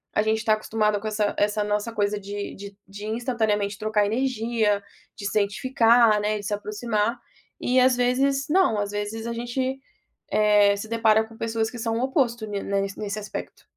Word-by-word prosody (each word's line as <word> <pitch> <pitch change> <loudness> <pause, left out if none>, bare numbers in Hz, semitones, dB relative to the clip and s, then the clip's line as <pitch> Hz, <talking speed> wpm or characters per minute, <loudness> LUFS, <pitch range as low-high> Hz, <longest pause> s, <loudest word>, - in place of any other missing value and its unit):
a - - +4
gente 220 0 +1
está 220 -1 +2
acostumado 215 -1 0
com 220 - -4
essa 210 -1 0
essa 210 0 -1
nossa 210 +3 0
coisa 205 +1 +1
de 200 0 -6
de 200 - -7 0.3
de 205 +1 -6
instantaneamente 215 -5 -1
trocar 215 -1 +1
energia, 225 -3 0 0.4
de 200 - -7
se 200 - -1
identificar, 225 +1 +3
né, 210 0 0
de 205 - -8
se 210 - -2
aproximar, 210 +2 -1 0.4
e 255 +1 +3
às 255 -1 +4
vezes, 270 +3 +1
não, 355 - +3
às 205 0 -2
vezes 210 +2 -4
a 235 - -2
gente, 240 +2 -2 0.7
eh, 210 -1 +5
se 210 +2 -6
depara 220 -1 +3
com 225 0 -15
pessoas 225 -1 -1
que 240 - -8
são 225 - 0
o - - -1
oposto 250 -4 0
ni 205 -1 -3
ne 200 0 +2 0.2
nesse 210 0 -3
aspecto. 205 - -7
215 Hz, 185 wpm, -25 LUFS, 205-235 Hz, 0.7 s, eh